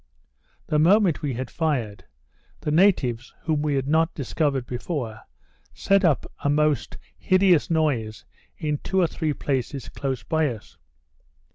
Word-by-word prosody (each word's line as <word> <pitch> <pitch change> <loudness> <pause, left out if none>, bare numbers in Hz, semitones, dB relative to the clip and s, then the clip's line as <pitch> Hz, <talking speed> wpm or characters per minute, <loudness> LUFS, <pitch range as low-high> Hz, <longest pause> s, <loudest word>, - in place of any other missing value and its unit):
The 150 - +1
moment 185 +1 +4
we 140 -5 -2
had 130 +1 -5
fired, 130 -11 -2 0.6
the 150 - -2
natives, 150 - +2
whom 155 -2 0
we 150 -1 0
had 135 0 -1
not 160 +2 +2
discovered 140 -1 -1
before, 120 -3 -4 0.6
set 195 0 +2
up 160 -6 +2 0.2
a 145 - +1
most 150 0 +1 0.2
hideous 185 -4 +3
noise 135 -10 -1 0.3
in 150 -2 -2
two 190 - -1
or 180 - +4
three 155 -1 -2
places 135 -1 -3
close 130 -4 -4
by 160 +5 +1
us. 115 -6 -7
150 Hz, 140 wpm, -24 LUFS, 130-160 Hz, 0.6 s, moment